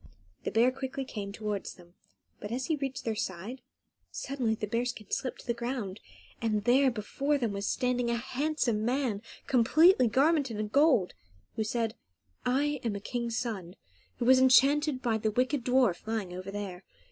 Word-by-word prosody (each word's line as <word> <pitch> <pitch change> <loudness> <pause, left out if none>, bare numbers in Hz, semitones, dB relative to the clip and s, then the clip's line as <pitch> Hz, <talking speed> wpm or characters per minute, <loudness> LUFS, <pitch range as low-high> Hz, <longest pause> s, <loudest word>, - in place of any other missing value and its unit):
The - - +1
bear 235 +3 +4
quickly 265 0 -5
came 205 -5 -5
towards 210 -1 -4
them, 175 -1 -18 0.5
but 205 - -7
as 255 +2 -2
he 320 - +1
reached 275 -2 -4
their 225 - 0
side, 205 +6 -4 0.5
suddenly 255 -5 -2
the 215 - -3
bear 230 +3 -1
skin 240 -4 -6
slipped 255 - -2
to - - -18
the 235 - 0
ground, 235 -4 -4 0.4
and 215 -3 0
there 260 +4 +5
before 270 +6 -1
them 235 -6 -1
was 200 +1 -3
standing 250 0 0
a 235 - +1
handsome 250 -2 -1
man, 245 -4 0 0.2
completely 265 +4 +5
garmented 270 0 +2
in 210 0 -2
gold, 270 - +3 0.4
who 220 - 0
said, 225 0 -1 0.5
"I 285 +3 +1
am 225 -4 -1
a - - -3
king's 235 +2 -3
son, 195 -8 -4 0.4
who 240 - -2
was 260 +1 +7
enchanted 275 +2 +4
by 225 -3 +1
the 220 - 0
wicked 255 +4 0
dwarf 245 -7 +2
lying 215 -5 -2
over 185 +2 -6
there. 195 -2 -6
235 Hz, 175 wpm, -30 LUFS, 210-265 Hz, 0.5 s, was